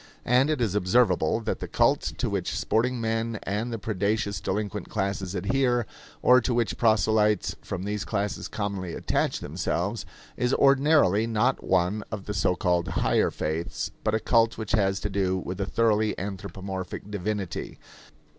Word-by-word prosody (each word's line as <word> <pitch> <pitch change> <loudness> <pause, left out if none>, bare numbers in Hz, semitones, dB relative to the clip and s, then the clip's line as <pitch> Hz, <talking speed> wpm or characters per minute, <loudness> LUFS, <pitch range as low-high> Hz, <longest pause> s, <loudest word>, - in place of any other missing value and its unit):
And 125 +4 +4
it 150 -5 0
is 110 -6 +1
observable 110 +3 +2
that 110 - -2
the - - -5
cult - - +3 0.2
to - - -1
which - - -2
sporting 120 +3 +1
men 115 -1 -1
and 105 +5 -2
the 115 - -2
predaceous 100 -2 -1
delinquent 105 +1 -3
classes 100 -2 -2
adhere, 120 +4 +1 0.4
or 125 0 +6
to 120 +1 -1
which 120 -2 0
proselytes 110 -2 +2
from 95 -2 -5
these 105 +1 -2
classes 105 -1 -2
commonly 100 -4 -4
attach - - -1
themselves, - - -2 0.3
is 125 +1 +1
ordinarily 135 - +4
not 115 +4 +1
one 95 +3 +1
of 105 -3 -5
the 105 - -3
so 90 -1 +1
called 90 -2 +1
higher 95 - +2
faiths, 80 +2 -3
but 110 - +1
a - - +1
cult 115 0 +2
which 110 -1 -5
has 95 -3 +2
to 105 - -2
do 95 -1 +1
with 95 +1 -5
a 100 - -1
thoroughly 110 -2 +2
anthropomorphic 95 0 -6
divinity. 105 -2 -3
105 Hz, 160 wpm, -26 LUFS, 95-115 Hz, 0.4 s, or